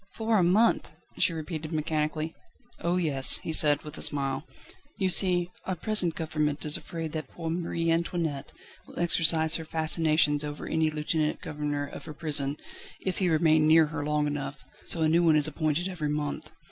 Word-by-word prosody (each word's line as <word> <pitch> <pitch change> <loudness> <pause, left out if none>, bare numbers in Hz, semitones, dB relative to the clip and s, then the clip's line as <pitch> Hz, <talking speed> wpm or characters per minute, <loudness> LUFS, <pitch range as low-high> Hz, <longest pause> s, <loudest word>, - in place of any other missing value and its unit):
"For 225 -1 +1
a - - +3
month!" 205 +7 +2 0.3
she - - +3
repeated 160 -1 -6
mechanically. 155 0 -2 0.5
"Oh 175 +1 -1
yes!" 145 -7 +5
he 160 - -5
said, 145 -2 +5
with 150 0 -9
a - - -6
smile. 140 +1 0 0.5
"You 190 -2 0
see, 180 -1 +3
our 185 - -2
present 180 -3 0
Government 150 -2 -2
is 150 - +5
afraid 165 -2 -4
that 155 -3 -5
poor 165 +2 -6
Marie 165 -1 -2
Antoinette 165 -4 -2 0.4
will - - -14
exercise 165 -2 +3
her 165 - -7
fascinations 155 -2 +1
over 150 0 -6
any 160 -1 0
lieutenant 155 0 -2
governor 145 -1 -4
of 140 - -10
her 155 -2 -9
prison, 145 -3 +1 0.4
if 190 - -3
he 185 -2 +1
remain 155 -1 +3
near 160 0 +6
her 150 -2 -3
long 150 0 0
enough, 145 -1 -5 0.2
so 165 - +2
a - - +3
new 170 +2 +2
one 160 -2 +4
is 150 -1 +3
appointed 155 +3 -1
every 165 -6 -4
month. 150 -1 -4
155 Hz, 180 wpm, -27 LUFS, 150-170 Hz, 0.5 s, near